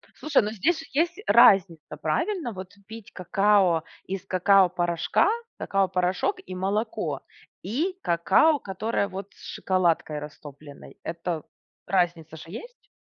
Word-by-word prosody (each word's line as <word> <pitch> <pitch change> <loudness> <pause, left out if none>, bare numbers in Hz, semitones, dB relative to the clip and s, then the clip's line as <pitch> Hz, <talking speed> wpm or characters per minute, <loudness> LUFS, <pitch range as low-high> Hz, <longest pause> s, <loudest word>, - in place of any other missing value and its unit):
Слушай, 300 -4 +2
ну, 210 - -3
здесь 320 - -1
есть 335 +4 +1
же 420 - -11
разница, 175 -10 +4
правильно, 240 - -1
вот? 185 0 -9
Пить 225 -1 -11
какао 190 -2 +2 0.2
из 195 0 -5
какао-порошка. 185 - +2 0.3
Какао-порошок, 190 - 0
и - - -8
молоко, 195 - -2 0.4
и 320 - -2
какао, 190 - +3
которое, 200 +2 -2
вот, 195 0 -7
с - - -21
шоколадкой 170 -5 0
растопленной. 145 -1 -12
Это 165 -1 -4 0.4
разница 170 -4 0
же - - -10
есть? 485 - -11
190 Hz, 120 wpm, -25 LUFS, 170-225 Hz, 0.4 s, разница